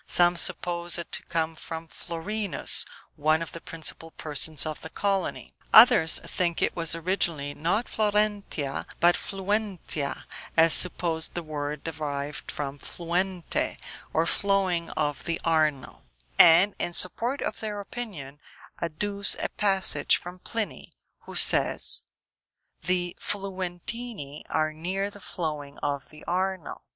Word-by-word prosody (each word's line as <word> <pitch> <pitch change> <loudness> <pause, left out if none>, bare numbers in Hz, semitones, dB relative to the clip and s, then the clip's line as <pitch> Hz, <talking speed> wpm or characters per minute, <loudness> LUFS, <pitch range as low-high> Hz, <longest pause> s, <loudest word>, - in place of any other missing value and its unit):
Some 175 0 +4
suppose 175 0 +2
it 170 - -7
to - - 0
come 165 -1 -2
from 160 +1 -7
Florinus, 180 +3 +1 0.3
one 155 +2 +1
of 165 - -9
the 165 - -9
principal 165 0 -4
persons 155 0 +2
of 155 -1 -5
the 160 - -8
colony; 195 +1 -3 0.2
others 195 -8 +7
think 170 -2 -2
it - - 0
was 165 -2 +2
originally 165 -4 -2
not 175 +11 -1
Florentia, 210 -9 -1
but 175 +1 +5
Fluentia, 195 -7 -3 0.3
and 165 0 +6
suppose 170 -3 +4
the 175 - -6
word 150 -1 -5
derived 145 -2 -5
from 140 -1 -6
fluente, 175 +2 -3 0.3
or 160 - +1
flowing 190 -3 0
of 145 -2 -2
the 165 -1 -2
Arno; 155 -4 0 0.4
and 175 +5 +7
in 175 - -2
support 235 +11 +5
of - - -4
their 210 -2 -5
opinion, 195 - -8 0.4
adduce 200 +5 +2
a - - -4
passage 195 -3 +2
from 180 +1 -10
Pliny, 225 +2 -5 0.4
who - - -9
says, - - +5 0.8
"the 180 -1 -1
Fluentini 190 - -4
are 155 0 -1
near 190 +5 -3
the 205 - -13
flowing 150 -6 -5
of 140 -1 -4
the 155 0 -13
Arno." 185 -2 -3
170 Hz, 130 wpm, -26 LUFS, 155-195 Hz, 0.8 s, others